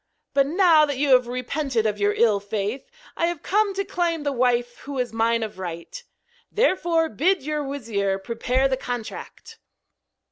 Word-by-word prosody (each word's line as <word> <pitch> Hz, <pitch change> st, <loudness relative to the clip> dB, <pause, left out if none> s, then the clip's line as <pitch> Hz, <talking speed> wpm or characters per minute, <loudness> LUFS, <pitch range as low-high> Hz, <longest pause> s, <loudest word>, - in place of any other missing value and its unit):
But 275 Hz, 0 st, +3 dB
now 335 Hz, -1 st, +5 dB
that 285 Hz, -2 st, -3 dB
you 285 Hz, +1 st, +1 dB
have 250 Hz, -2 st, +5 dB
repented 250 Hz, -1 st, -2 dB
of 210 Hz, -1 st, -1 dB
your 205 Hz, 0 st, +2 dB
ill 215 Hz, -3 st, +3 dB
faith, 205 Hz, -, -4 dB, 0.3 s
I 335 Hz, -, +1 dB
have 345 Hz, -3 st, -4 dB
come 410 Hz, 0 st, +1 dB
to 395 Hz, 0 st, -1 dB
claim 340 Hz, -4 st, -1 dB
the 285 Hz, -, 0 dB
wife 245 Hz, -2 st, 0 dB
who 280 Hz, -1 st, -7 dB
is 250 Hz, -2 st, -2 dB
mine 230 Hz, 0 st, +1 dB
of 210 Hz, -3 st, -7 dB
right. 175 Hz, -, -7 dB, 0.5 s
Therefore 345 Hz, -7 st, +2 dB
bid 345 Hz, -, +1 dB
your 300 Hz, +1 st, -2 dB
wizir 220 Hz, -8 st, -2 dB
prepare 240 Hz, +6 st, 0 dB
the 260 Hz, -1 st, -1 dB
contract.' 245 Hz, -3 st, -7 dB
260 Hz, 170 wpm, -24 LUFS, 225-320 Hz, 0.5 s, now